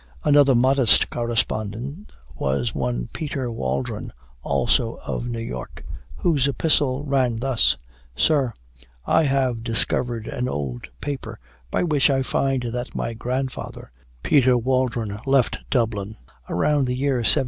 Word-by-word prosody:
Another 145 -2 +5
modest 130 -1 +4
correspondent 120 - -2 0.2
was 65 -2 -1
one - - -2
Peter 140 -5 -3
Waldron, 115 -1 -3 0.3
also 120 - +1
of 120 - -3
New 120 -1 -3
York, 115 - -6 0.3
whose 150 -7 +2
epistle 140 -1 +1
ran 130 -5 +1
thus: 115 - +2 0.4
"Sir, 140 - +2 0.5
I 160 - +3
have 130 -4 +1
discovered 115 0 0
an 125 +1 -2
old 65 - -4
paper, 130 -6 -5 0.3
by - - 0
which 150 -6 +3
I 135 -1 +2
find 135 -1 0
that 120 +1 -4
my 115 - -2
grandfather, 125 - -4 0.3
Peter 130 -3 +4
Waldron, 120 -4 0
left 135 -3 +3
Dublin 110 -4 0 0.3
about 140 - +2
the 125 - -1
year 135 0 +1
1730. 120 - -1
125 Hz, 125 wpm, -23 LUFS, 115-135 Hz, 0.5 s, Another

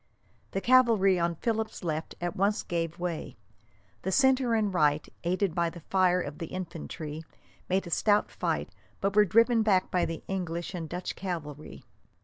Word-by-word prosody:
The 195 - -3
cavalry 225 -7 +5
on 170 0 0
Philip's 220 +3 -2
left 160 -1 -3
at 175 -1 -3
once 200 +2 +1
gave 165 -1 -2
way. 175 -8 -4 0.6
The 190 - -2
centre 260 -1 +3
and 210 -3 +1
right, 150 -3 +2 0.2
aided 185 +1 0
by 170 -1 +1
the 170 0 -11
fire 180 +1 +2
of 150 -4 -5
the 165 - -4
infantry, 165 -3 -6 0.5
made 190 +1 +1
a 170 - -8
stout 205 +4 +2
fight, - - -2 0.3
but 195 0 -1
were 210 0 +7
driven 230 +4 +4
back 195 -4 +2
by 180 -1 +2
the 165 - -5
English 175 -2 -3
and 165 -3 -5
Dutch 180 +1 -4
cavalry. 155 -6 -6
180 Hz, 165 wpm, -29 LUFS, 165-205 Hz, 0.6 s, were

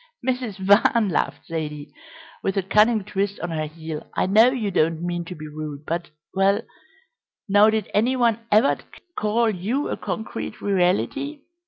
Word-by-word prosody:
"Mrs. 250 -6 -1
Van," 200 +3 +4
laughed 165 - -1
Zaidie, 150 -3 -5 0.5
with 195 0 -1
a 195 - +1
cunning 215 +3 +3
twist 200 0 -2
on 175 - -4
her 155 -1 -2
heel, 160 0 -7
"I - - +2
know 215 +6 +6
you 235 -6 -2
don't 165 -1 +1
mean 175 -1 -2
to 180 - -7
be 155 0 -8
rude, 150 -1 -7
but 170 +1 -3 0.2
well, 195 +3 +2 0.8
now 205 +2 +6
did 220 -2 0
any 235 +5 +2
one 235 -3 +2
ever 215 +6 +4 0.4
call 220 +2 +1
you 215 +10 -2
a - - -2
concrete 210 +2 -5
reality? 205 - 0
200 Hz, 160 wpm, -23 LUFS, 170-220 Hz, 0.8 s, know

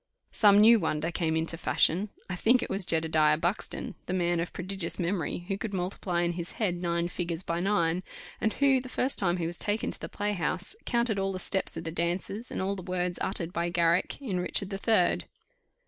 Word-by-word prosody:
Some 205 -2 +5
new 225 +2 +7
wonder 160 -1 -1
came 160 -1 0
into 165 +1 0
fashion; 180 +4 +2 0.2
I 180 - -3
think 240 +7 +3
it - - -5
was 195 -1 -1
Jedediah 160 -2 +3
Buxton, 175 +5 -3
the 185 - -1
man 175 -1 +1
of 170 - -3
prodigious 185 -1 -3
memory, 175 -1 -2
who 195 -1 -2
could 205 -2 -4
multiply 180 -1 -1
in 170 - +1
his 170 0 -5
head 185 -6 -1
nine 170 -1 -1
figures 175 -1 -4
by 170 0 -2
nine; 180 -3 +1 0.4
and 220 - +1
who, 275 -2 +3
the 255 - -9
first 255 +1 +1
time 175 -2 +2
he 170 - -2
was 170 +1 -3
taken 210 +1 -1
to - - -3
the - - -6
playhouse, 190 -4 -2
counted 235 -4 +1
all 195 0 0
the 185 - -4
steps 190 -1 0
of 165 - -5
the 165 - -4
dancers, 180 +7 -2
and - - -3
all 195 +1 -1
the 190 - -7
words 180 -1 -2
uttered 175 -3 -2
by 170 +1 -1
Garrick 170 0 +1
in 210 -10 -2
Richard 185 +2 +1
the 195 - -3
Third. 205 -5 +2
180 Hz, 210 wpm, -28 LUFS, 170-200 Hz, 0.4 s, new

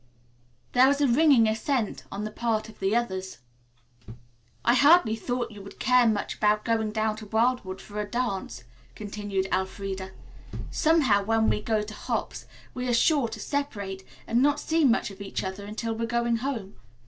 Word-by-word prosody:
There 255 +1 +6
was 280 +1 +2
a 285 - +3
ringing 260 -3 +5
assent 220 +1 -1
on 200 +2 -4
the 215 - -4
part 225 -1 -1
of 220 - -15
the 195 +3 +1
others. 190 -6 -2 1.3
"I 240 - +5
hardly 285 -2 +5
thought 245 +1 -3
you 205 -2 -10
would 200 - -12
care 250 -1 +4
much 215 -2 -1
about 210 0 +2
going 225 -2 0
down 215 0 -1
to 215 -1 -9
Wildwood 220 -3 0
for 210 0 -6
a 205 - -6
dance," 195 - -3 0.3
continued 205 -2 -3
Elfreda. 190 0 -3 0.6
"Somehow 285 -11 +3
when 220 +1 +2
we - - -1
go 215 -1 0
to 210 0 -8
hops - - -4 0.3
we 250 0 -4
are 240 - +2
sure 280 +1 +3
to 220 -1 -8
separate 205 -9 -4 0.2
and 235 +2 +1
not 290 +1 +3
see 325 0 +1
much 240 -4 +2
of 195 +1 -12
each 200 - -4
other 190 +2 -5
until 225 +2 -3
we're 230 +1 -3
going 235 0 +1
home. 225 -6 -4
220 Hz, 175 wpm, -26 LUFS, 205-250 Hz, 1.3 s, There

